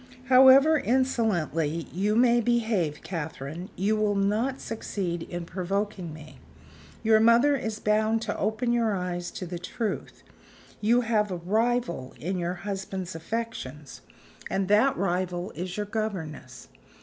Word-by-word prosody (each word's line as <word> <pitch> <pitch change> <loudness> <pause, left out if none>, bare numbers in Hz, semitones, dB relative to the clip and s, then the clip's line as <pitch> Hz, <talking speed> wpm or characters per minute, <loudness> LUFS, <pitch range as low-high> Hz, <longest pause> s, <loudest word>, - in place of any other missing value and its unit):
"However 265 +4 +7
insolently 180 - 0
you 205 +4 +1
may 240 0 +4
behave, 220 -10 0
Catherine, 160 0 -5
you 205 +4 +1
will 210 -1 +1
not 215 +7 0
succeed 185 -6 -4
in 175 0 -6
provoking 190 0 -3
me. 155 0 -12 0.6
Your 220 -1 +5
mother 235 +6 +5
is 220 -5 -3
bound 215 +1 +2
to 210 - -2
open 235 +3 0
your 230 -3 +1
eyes 175 -1 -3
to 185 - -6
the 175 0 -6
truth. 210 +5 -4 0.6
You 235 +4 +3
have 220 -3 +1
a 180 - -3
rival 215 - -1
in 185 +3 -2
your 175 +1 -2
husband's 190 -2 -4
affections; 165 - -5 0.5
and 195 -1 0
that 215 +7 +4
rival 180 -1 -1
is 180 +4 -5
your 210 - -1
governess. 200 -8 -5
205 Hz, 135 wpm, -27 LUFS, 175-225 Hz, 0.6 s, However